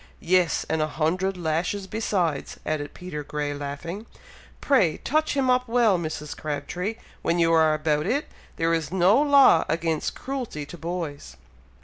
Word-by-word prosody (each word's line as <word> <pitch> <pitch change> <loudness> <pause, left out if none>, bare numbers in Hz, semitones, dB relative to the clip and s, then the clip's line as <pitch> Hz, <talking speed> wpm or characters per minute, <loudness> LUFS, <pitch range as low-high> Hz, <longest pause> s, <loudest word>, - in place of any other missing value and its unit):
"Yes! 180 -1 +2
and 160 0 0
a 155 - +1
hundred 180 +5 -1
lashes 175 +4 -1
besides!" 185 -8 -2
added 145 -2 -3
Peter 175 -5 -6
Grey, 145 0 -3
laughing. 145 +9 -6 0.5
"Pray 200 - +3
touch 310 +2 0
him 270 -1 +2
up 250 0 +2
well, 230 -5 +3
Mrs. 155 -2 -5
Crabtree, 180 +7 -4 0.3
when 170 - +1
you 165 -1 +3
are 160 -1 +4
about 150 0 0
it. 285 +4 0 0.3
There 165 0 +1
is 160 -2 -1
no 190 +7 +4
law 280 - +6
against 165 -2 -1
cruelty 250 - -5
to 160 - -10
boys!" 160 - -5
170 Hz, 150 wpm, -25 LUFS, 155-205 Hz, 0.5 s, law